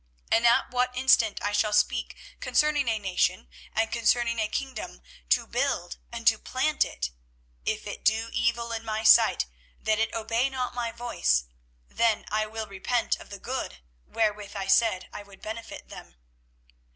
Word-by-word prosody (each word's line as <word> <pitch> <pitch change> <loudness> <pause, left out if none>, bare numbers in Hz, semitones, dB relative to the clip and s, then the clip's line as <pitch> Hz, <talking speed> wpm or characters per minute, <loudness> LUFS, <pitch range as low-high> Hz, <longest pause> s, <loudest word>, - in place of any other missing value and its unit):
24:018:009 - - +6
And 235 - +4
at 235 - +3
what 250 0 0
instant 235 -5 +3
I 205 - 0
shall 210 +1 +1
speak 210 - +1 0.2
concerning 300 -3 +2
a 225 -1 +2
nation, 190 - 0 0.3
and 225 0 +1
concerning 230 0 +2
a 215 - +1
kingdom, 215 - -5 0.3
to - - +3
build 60 - -1
and - - -7
to - - +5
plant - - +1
it; - - -4 0.6
24:018:010 - - +2
If 215 - -14
it 205 - -7
do 225 +1 +2
evil 235 0 0
in 225 0 -3
my 220 0 -3
sight, 215 - +6 0.3
that 215 0 +1
it 225 - +1
obey 230 +3 0
not 255 -2 -3
my 240 -2 -2
voice, 225 - +1 0.4
then 230 -2 +1
I 215 0 +1
will 220 0 -5
repent 215 +4 -1
of - - -13
the 200 - -7
good, 215 - -5 0.2
wherewith 210 -2 -1
I 195 -1 -3
said 195 -1 +3
I - - -6
would 200 -1 -16
benefit 220 +2 -8
them. - - -11
225 Hz, 175 wpm, -27 LUFS, 205-235 Hz, 0.6 s, 24:018:009